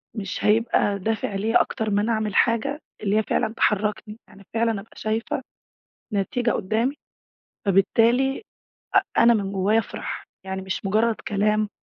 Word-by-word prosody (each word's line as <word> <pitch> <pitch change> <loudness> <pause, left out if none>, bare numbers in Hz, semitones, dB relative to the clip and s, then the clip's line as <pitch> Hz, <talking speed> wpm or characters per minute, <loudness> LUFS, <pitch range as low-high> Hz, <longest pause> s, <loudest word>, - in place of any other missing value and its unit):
مش 200 -1 -4
هيبقى 210 -2 +2
دافع 215 0 -2
ليّا 215 +3 +3
أكتر 220 -1 -2
ما 205 0 +2
أنا 225 +2 0
أعمل 215 -2 -1
حاجة، 275 +6 +2 0.2
اللي 205 +1 +2
هي 220 - +3
فعلًا 220 - 0
تحركني. 210 0 0
يعني 200 0 -16
فعلًا 230 0 +2
أبقى 220 - -18
شايفة 220 +4 -2 0.7
نتيجة 235 +4 0
قدامي، 225 +8 0 0.7
فبالتالي 235 - +3 0.5
أ - - +9 0.2
أنا 235 0 +6
من 200 -2 -1
جوايا 200 +3 +2
أفرح، 225 - -4 0.2
يعني 190 0 -4
مش 190 +1 -4
مجرد 220 +3 +2
كلام 210 +1 +1
215 Hz, 145 wpm, -24 LUFS, 200-230 Hz, 0.7 s, أ